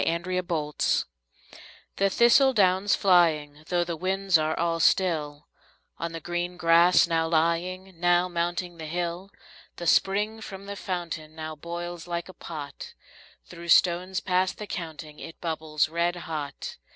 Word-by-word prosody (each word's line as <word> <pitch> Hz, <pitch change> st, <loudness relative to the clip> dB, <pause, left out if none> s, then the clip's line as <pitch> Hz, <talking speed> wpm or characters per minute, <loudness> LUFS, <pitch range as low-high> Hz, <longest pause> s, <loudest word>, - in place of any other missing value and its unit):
Autumn 170 Hz, -3 st, -2 dB, 1.2 s
The 195 Hz, 0 st, +3 dB
thistle 240 Hz, +6 st, +5 dB
down's 190 Hz, -2 st, +3 dB
flying, 155 Hz, -6 st, +2 dB
though 175 Hz, -1 st, +1 dB
the 170 Hz, -1 st, -4 dB
winds 190 Hz, +2 st, 0 dB
are 155 Hz, 0 st, +2 dB
all 165 Hz, 0 st, 0 dB
still, 150 Hz, -5 st, +1 dB, 0.5 s
On 170 Hz, 0 st, -3 dB
the 165 Hz, -, -6 dB
green 175 Hz, +2 st, -3 dB
grass 170 Hz, +1 st, +5 dB
now 165 Hz, -1 st, 0 dB
lying, 170 Hz, +3 st, -1 dB
now 175 Hz, +1 st, +3 dB
mounting 175 Hz, 0 st, -2 dB
the 160 Hz, -, -6 dB
hill, 175 Hz, +3 st, -3 dB, 0.5 s
The 175 Hz, -, -7 dB
spring 210 Hz, +5 st, +2 dB
from 195 Hz, -2 st, -8 dB
the 200 Hz, 0 st, -6 dB
fountain 170 Hz, -5 st, -5 dB
now 155 Hz, -1 st, -6 dB
boils 170 Hz, +2 st, -6 dB
like 170 Hz, -1 st, -3 dB
a -, -, -10 dB
pot; 150 Hz, -5 st, -8 dB, 0.5 s
Through 170 Hz, 0 st, -11 dB
stones 180 Hz, +2 st, +3 dB
past 185 Hz, 0 st, 0 dB
the 210 Hz, -, -6 dB
counting 160 Hz, -5 st, -7 dB
it 165 Hz, -, -10 dB
bubbles 155 Hz, -3 st, -1 dB
red 170 Hz, +2 st, 0 dB
hot. 155 Hz, -5 st, -6 dB
175 Hz, 140 wpm, -26 LUFS, 160-185 Hz, 1.2 s, thistle